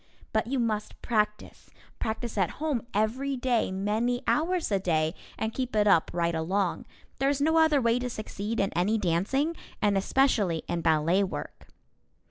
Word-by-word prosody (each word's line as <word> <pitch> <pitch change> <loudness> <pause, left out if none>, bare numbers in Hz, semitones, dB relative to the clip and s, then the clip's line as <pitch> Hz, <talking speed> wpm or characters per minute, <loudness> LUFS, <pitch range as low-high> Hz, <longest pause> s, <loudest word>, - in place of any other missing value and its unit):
But 220 0 +1
you 270 +2 -1
must 220 -3 -2
practice, 210 -2 -2 0.3
practice 225 +1 -3
at 190 -4 +1
home, 290 -7 -2
every 255 +7 0
day, 245 -5 +1
many 215 +6 -1
hours 340 -2 +1
a 200 - +2
day, 160 -3 +1 0.2
and 220 0 -2
keep 255 -3 -3
it 210 -1 +4
up 195 -6 +4
right 170 -1 0
along. 180 +3 -1 0.3
There 270 +1 +2
is 285 -1 0
no 320 +3 +3
other 315 -3 +4
way 235 -1 +2
to 250 0 -3
succeed 215 0 -4
in 195 - 0
any 195 +6 +2
dancing, 220 - 0 0.2
and 205 -1 +2
especially 195 - +2
in 170 -1 -2
ballet 165 +4 +3
work. 190 - -6
215 Hz, 165 wpm, -28 LUFS, 190-255 Hz, 0.3 s, it